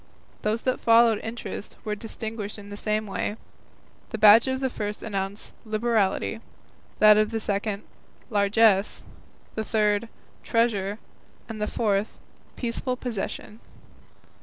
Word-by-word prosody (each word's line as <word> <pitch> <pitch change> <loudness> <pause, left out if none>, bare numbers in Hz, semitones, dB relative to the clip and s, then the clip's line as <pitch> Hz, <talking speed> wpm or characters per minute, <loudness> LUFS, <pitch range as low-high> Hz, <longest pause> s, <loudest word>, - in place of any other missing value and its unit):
Those 215 +2 0
that 255 - 0
followed 230 -1 +5
Interest 225 -3 -6
were 210 - -1
distinguished 220 0 -5
in 205 0 -11
the - - -5
same 215 +1 -1
way; 205 +1 -3 0.7
the 220 - -4
badge 215 +3 +8
of 260 0 0
the 265 - 0
first 210 -2 -4
announced 195 -1 -4
"Liberality," 220 -1 0 0.6
that 215 0 +7
of 215 0 +3
the 225 0 -2
second 205 0 -2 0.5
"Largess," 205 0 +3 0.5
the 220 - -2
third 210 0 +1 0.3
"Treasure," 210 -4 +1 0.5
and 220 -2 -7
the 210 - 0
fourth 205 -2 0 0.4
"Peaceful 250 +1 -2
Possession." 220 -2 -5
215 Hz, 125 wpm, -26 LUFS, 205-230 Hz, 0.7 s, badge